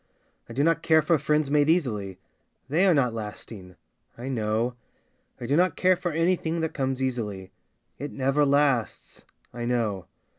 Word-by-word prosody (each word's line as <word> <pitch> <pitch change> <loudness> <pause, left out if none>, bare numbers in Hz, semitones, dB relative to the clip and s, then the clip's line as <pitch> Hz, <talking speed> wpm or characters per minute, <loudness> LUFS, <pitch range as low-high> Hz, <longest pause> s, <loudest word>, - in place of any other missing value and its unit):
I - - -7
do 135 +4 +1
not 165 +1 +2
care 160 -1 +4
for 160 0 +2
friends 150 0 0
made 150 0 +3
easily, 105 - 0 0.5
They 170 +7 +3
are 185 - +5
not 125 -5 +2
lasting 105 -4 -8 0.2
— - - -41
I 125 +3 -6
know. 115 0 -1 0.7
I - - -6
do 135 +4 +1
not 180 +3 +2
care 185 0 +3
for 180 0 -3
anything 165 0 0
that 160 - -2
comes 135 -1 -2
easily, 105 -7 -3 0.5
It 145 - -5
never 135 +2 +1
lasts 140 -4 0
— - - -39
I 120 0 -5
know. 115 -6 -1
135 Hz, 175 wpm, -26 LUFS, 115-160 Hz, 0.7 s, are